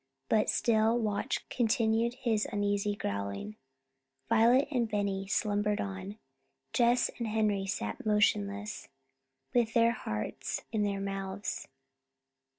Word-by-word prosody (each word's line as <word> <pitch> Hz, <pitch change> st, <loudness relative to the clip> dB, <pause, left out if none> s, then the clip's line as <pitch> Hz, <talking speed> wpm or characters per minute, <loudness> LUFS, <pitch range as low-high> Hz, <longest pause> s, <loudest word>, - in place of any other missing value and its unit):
But 215 Hz, -1 st, +3 dB
still 225 Hz, 0 st, +3 dB
Watch 210 Hz, -3 st, -1 dB
continued 230 Hz, 0 st, +1 dB
his 225 Hz, -4 st, 0 dB
uneasy 205 Hz, 0 st, 0 dB
growling. 100 Hz, -, -4 dB, 0.7 s
Violet 245 Hz, +5 st, +5 dB
and 240 Hz, -5 st, +1 dB
Benny 200 Hz, -2 st, -1 dB
slumbered 205 Hz, 0 st, +1 dB
on. 195 Hz, +1 st, -5 dB, 0.6 s
Jess 245 Hz, 0 st, +3 dB
and 235 Hz, -, -1 dB
Henry 210 Hz, -3 st, +1 dB
sat 105 Hz, -, -3 dB
motionless, 210 Hz, 0 st, +1 dB, 0.6 s
with 235 Hz, -2 st, +2 dB
their 230 Hz, 0 st, +5 dB
hearts 105 Hz, -, -4 dB
in 220 Hz, -2 st, 0 dB
their 200 Hz, -1 st, 0 dB
mouths. 195 Hz, 0 st, -4 dB
210 Hz, 110 wpm, -31 LUFS, 200-225 Hz, 0.7 s, Violet